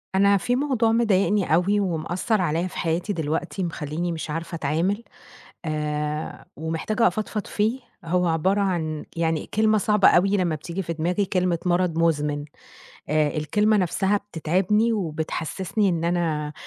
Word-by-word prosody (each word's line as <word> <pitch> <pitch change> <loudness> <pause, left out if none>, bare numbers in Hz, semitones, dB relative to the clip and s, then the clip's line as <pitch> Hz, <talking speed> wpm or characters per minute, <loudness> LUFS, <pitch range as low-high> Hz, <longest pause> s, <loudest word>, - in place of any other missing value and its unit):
أنا 200 +1 +5
في 245 +5 0
موضوع 255 -5 +1
مضايقني 205 -5 +2
أوي 195 +5 +3
ومأثّر 185 +3 0
عليّا 170 +1 0
في - - -9
حياتي 170 +5 -1
دلوقتي، 165 +4 -2
مخلّيني 165 +1 -3
مش 160 -1 -5
عارفة 165 +3 -4
أتعامل، 165 +8 0 0.6
آآ 150 -1 -3
ومحتاجة 165 +9 0
أفضفض 215 -1 -2
فيه، 220 +5 0 0.2
هو 180 +2 +1
عبارة 175 +5 +1
عن 160 -6 -1
يعني 165 -2 0
كلمة 215 0 +3
صعبة 210 0 +4
أوي 195 +3 +4
لمّا 175 -4 +1
بتييجي 170 +5 -5
في 170 - -3
دماغي، 175 +5 0
كلمة 180 -2 0
مرض 175 -2 +1
مُزمِن. 150 -3 +1 0.6
آآ، 150 0 +1
الكلمة 210 +8 +2
نَفْسها 190 +1 +1
بتتعبني 200 +4 +1
وبتحسِّسني 175 +2 -1
إن 170 -2 0
أنا 160 -4 0
175 Hz, 140 wpm, -24 LUFS, 160-205 Hz, 0.6 s, أنا